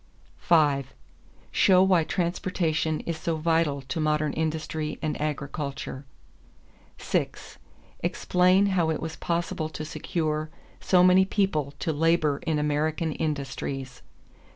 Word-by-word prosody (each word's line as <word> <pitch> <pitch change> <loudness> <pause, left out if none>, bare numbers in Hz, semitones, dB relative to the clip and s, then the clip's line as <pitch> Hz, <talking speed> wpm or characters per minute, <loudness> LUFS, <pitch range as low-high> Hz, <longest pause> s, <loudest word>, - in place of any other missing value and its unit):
5. 145 -5 +2 0.6
Show 185 -1 +5
why 185 -3 +4
transportation 170 -2 -1
is 165 -1 -4
so 165 0 -1
vital 160 -3 +1
to 135 +5 -4
modern 150 -1 +1
industry 155 -1 -2
and 155 0 -2
agriculture. 140 -2 -4 0.9
6. - - -3 0.4
Explain 185 +2 +3
how 170 -4 +2
it 160 - -1
was 160 0 -5
possible 170 -2 -2
to 155 -1 -6
secure 155 0 -2 0.3
so 180 -1 +4
many 185 +1 +6
people 175 -8 0
to 160 - -2
labor 155 -2 +2
in 160 -2 +1
American 150 +2 0
industries. 135 -3 -4
155 Hz, 115 wpm, -26 LUFS, 150-170 Hz, 0.9 s, many